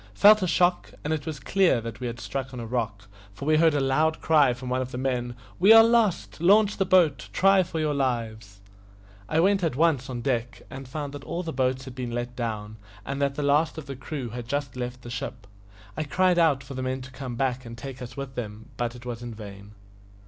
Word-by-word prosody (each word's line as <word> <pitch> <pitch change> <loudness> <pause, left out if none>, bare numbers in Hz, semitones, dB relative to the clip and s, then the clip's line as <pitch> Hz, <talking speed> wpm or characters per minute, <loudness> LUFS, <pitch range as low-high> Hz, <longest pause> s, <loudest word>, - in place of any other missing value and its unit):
felt 210 - +7
a 185 - +1
shock, 175 +1 +2
and 150 - -1
it 150 -1 -4
was 155 -3 -4
clear 185 -1 +2
that 115 0 -7
we 125 - -3
had 120 0 -6
struck 130 +5 -5
on - - -6
a 115 - -5
rock, 110 -3 -3 0.3
for 140 - -7
we 155 +1 +4
heard 160 -1 +4
a - - +2
loud 155 +4 +1
cry 150 -5 +4
from 125 +1 -6
one 125 +1 0
of 130 - -4
the 125 - -6
men, 125 -2 -2 0.2
"We 195 +5 +6
are 225 0 +10
lost! 200 - +1
Launch 205 +3 +4
the 195 - 0
boat; 175 -7 +3
try 195 0 +5
for 165 -2 -4
your 155 -1 0
lives!" 110 -7 -3 0.7
I 155 - +2
went 195 +2 +3
at 160 -7 0
once 145 -4 +2
on 120 -2 -4
deck, 120 -2 -2
and 135 0 -8
found 145 +1 -5
that 145 -1 -8
all 175 +4 -4
the 165 - -5
boats 130 0 0
had 130 - -8
been 125 -1 -4
let 120 +1 -4
down, 110 -3 -4 0.3
and 140 +1 -4
that 140 -1 +1
the 150 - -2
last 150 +3 +2
of 160 - -6
the 135 0 -6
crew 130 -1 -5
had 120 +1 -7
just 140 -1 -3
left 125 0 -5
the 120 - -8
ship. 125 -3 -6 0.5
I - - -2
cried 180 +4 +2
out 150 -5 +3
for 135 +1 -9
the 130 - -4
men 130 0 -3
to 130 - -11
come 130 -2 -6
back 130 0 -1
and 115 -1 -9
take 130 +1 -8
us 120 0 -8
with 135 -1 -5
them, 110 -3 -7
but 120 0 -2
it 120 0 -12
was 120 -1 -5
in 120 -2 -7
vain. 100 -1 -10
130 Hz, 245 wpm, -26 LUFS, 120-155 Hz, 0.7 s, are